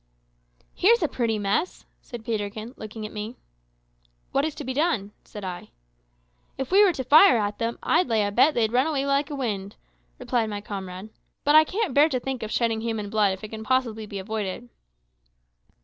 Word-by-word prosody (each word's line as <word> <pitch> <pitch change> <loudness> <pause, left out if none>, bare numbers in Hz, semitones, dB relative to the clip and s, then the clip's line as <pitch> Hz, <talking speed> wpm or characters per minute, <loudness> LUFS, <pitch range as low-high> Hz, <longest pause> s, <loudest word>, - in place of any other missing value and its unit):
"Here's 445 +1 +4
a - - +3
pretty 230 -5 -1
mess," 205 - -1 0.2
said 240 -3 -10
Peterkin, 215 +1 -4
looking 215 0 -8
at 215 - -7
me. 215 +3 -5 1.0
"What 275 +2 +1
is 310 -2 -3
to 300 - -6
be 260 -1 -3
done?" 265 - 0
said 210 - -10
I. 180 -2 -6 0.9
"If 265 +3 -4
we 400 +2 +7
were 395 - +5
to 270 -6 -4
fire 295 +1 +7
at 205 -1 -2
them, 230 +1 -2
I'd 335 0 +2
lay 220 -3 +2
a 205 - -2
bet 270 +8 +4
they'd 220 -2 +1
run 255 +4 +3
away 280 -3 -1
like 280 +1 +1
the 290 - -5
wind," 205 -7 -3 0.4
replied 230 -3 -1
my 205 -1 -4
comrade; 195 -1 -7 0.3
"but 290 - +3
I 310 0 +9
can't 390 - -2
bear 295 +4 +5
to 260 -4 -1
think 265 0 -4
of 220 - -4
shedding 225 -2 0
human 220 -3 -3
blood 210 -3 +3
if 190 - -9
it 215 - -6
can 220 0 -7
possibly 230 -3 0
be 200 - -6
avoided." 215 +3 -4
230 Hz, 195 wpm, -25 LUFS, 210-275 Hz, 1.0 s, I